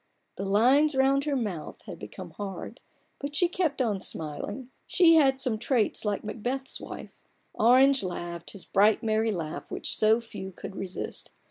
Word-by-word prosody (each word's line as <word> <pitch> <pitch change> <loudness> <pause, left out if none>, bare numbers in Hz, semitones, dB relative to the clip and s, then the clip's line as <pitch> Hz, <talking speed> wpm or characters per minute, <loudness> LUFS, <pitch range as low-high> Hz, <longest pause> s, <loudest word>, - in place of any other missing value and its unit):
The 195 - -4
lines 260 +9 +4
round 270 +1 +3
her 290 -2 0
mouth 205 - -4
had - - -9
become - - -9
hard, 200 -2 -7 0.4
but 285 +1 -5
she 355 +4 +4
kept 330 -7 0
on 210 -5 0
smiling: 205 - -4 0.2
she 345 -3 +5
had 270 -4 +5
some 245 -5 0
traits 240 -2 +1
like 205 -2 -1
Macbeth's 245 +5 -4
wife. - - -9 0.4
Orange 260 +4 +5
laughed 175 -2 -5
his 200 - -9
bright, 210 +3 +3
merry 220 0 +1
laugh 165 -6 -5
which - - -3
so 220 +1 +4
few 210 -5 -8
could 195 - -8
resist. 190 -1 -5
225 Hz, 160 wpm, -28 LUFS, 200-270 Hz, 0.4 s, she